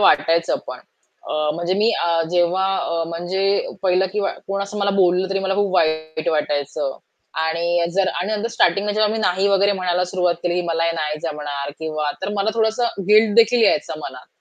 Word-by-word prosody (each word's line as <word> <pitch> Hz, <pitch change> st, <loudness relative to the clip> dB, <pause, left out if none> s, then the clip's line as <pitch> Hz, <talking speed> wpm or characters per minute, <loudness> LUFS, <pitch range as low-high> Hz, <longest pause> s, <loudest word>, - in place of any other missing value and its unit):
वाटायचं 165 Hz, -2 st, +3 dB
पण -, -, -7 dB, 0.5 s
अ, -, -, -3 dB, 0.2 s
म्हणजे 175 Hz, +2 st, -1 dB
मी 215 Hz, +3 st, +3 dB
अ, -, -, +1 dB, 0.2 s
जेव्हा 180 Hz, +2 st, +2 dB
अ, 165 Hz, 0 st, -1 dB
म्हणजे 175 Hz, +3 st, -3 dB, 0.4 s
पहिलं 185 Hz, 0 st, +2 dB
किंवा 205 Hz, -1 st, 0 dB, 0.2 s
कोण 195 Hz, 0 st, -2 dB
असं 205 Hz, +1 st, -6 dB
मला 200 Hz, 0 st, +1 dB
बोललं 185 Hz, 0 st, +2 dB
तरी 195 Hz, -, 0 dB
मला 195 Hz, 0 st, -1 dB
खूप 200 Hz, -1 st, 0 dB
वाईट 155 Hz, 0 st, 0 dB
वाटायचं. 145 Hz, -2 st, -2 dB, 0.4 s
आणि 170 Hz, +1 st, 0 dB
जर 195 Hz, -1 st, +2 dB
आणि 215 Hz, +4 st, -2 dB
स्टार्टिंगला 205 Hz, -2 st, +1 dB
जेव्हा 215 Hz, 0 st, +2 dB
मी 225 Hz, -, -2 dB
नाही 190 Hz, -1 st, +1 dB
वगैरे 200 Hz, +1 st, +3 dB
म्हणायला 180 Hz, -2 st, 0 dB
सुरुवात 180 Hz, -1 st, 0 dB
केली 175 Hz, -1 st, 0 dB
की 180 Hz, -, +1 dB
"मला 165 Hz, 0 st, 0 dB
हे 165 Hz, -, +1 dB
नाही 150 Hz, -1 st, -2 dB
जमणार" 145 Hz, -3 st, -4 dB
किंवा 155 Hz, -2 st, -2 dB
तर 190 Hz, -, -2 dB
मला 200 Hz, +2 st, +1 dB
थोडसं 220 Hz, -1 st, 0 dB
गिल्टदेखील 225 Hz, +2 st, +5 dB
यायचा 200 Hz, -3 st, +1 dB
मनात. 130 Hz, -3 st, -9 dB
180 Hz, 180 wpm, -20 LUFS, 165-200 Hz, 0.5 s, गिल्टदेखील